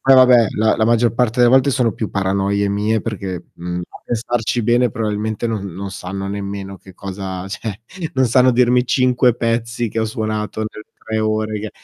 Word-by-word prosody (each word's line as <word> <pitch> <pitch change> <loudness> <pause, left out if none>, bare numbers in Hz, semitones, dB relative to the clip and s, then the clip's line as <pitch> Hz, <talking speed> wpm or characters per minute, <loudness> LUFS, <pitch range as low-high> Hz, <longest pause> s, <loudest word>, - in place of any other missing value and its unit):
Poi 135 0 +5
vabbè, 125 -3 +7
la 110 +1 +3
la 110 - +2
maggior 120 0 +3
parte 125 0 +1
delle 120 - +6
volte 135 +2 +5
sono 125 -4 +1
più 110 - -4
paranoie 100 +1 0
mie, 105 +2 0
perché, 95 -5 -5
mhmm, 90 +1 -4
a - - -14
pensarci 120 0 -1
bene 120 +2 +3
probabilmente 110 -1 -2
non 105 -3 -3
non 100 +1 -5
sanno 95 +2 -5
nemmeno 100 -1 -5
che 95 -2 -15
cosa, 95 -1 -6
cioè, 105 +1 -5 0.3
non 130 0 +3
sanno 125 +1 +4
dirmi 125 0 +3
5 125 -1 +3
pezzi 115 0 -1
che 115 - -4
ho 110 - +1
suonato 110 -1 -3
per 110 0 -7 0.2
3 110 0 -2
ore, 110 0 -1
che 110 - -5
110 Hz, 190 wpm, -19 LUFS, 100-120 Hz, 0.3 s, vabbè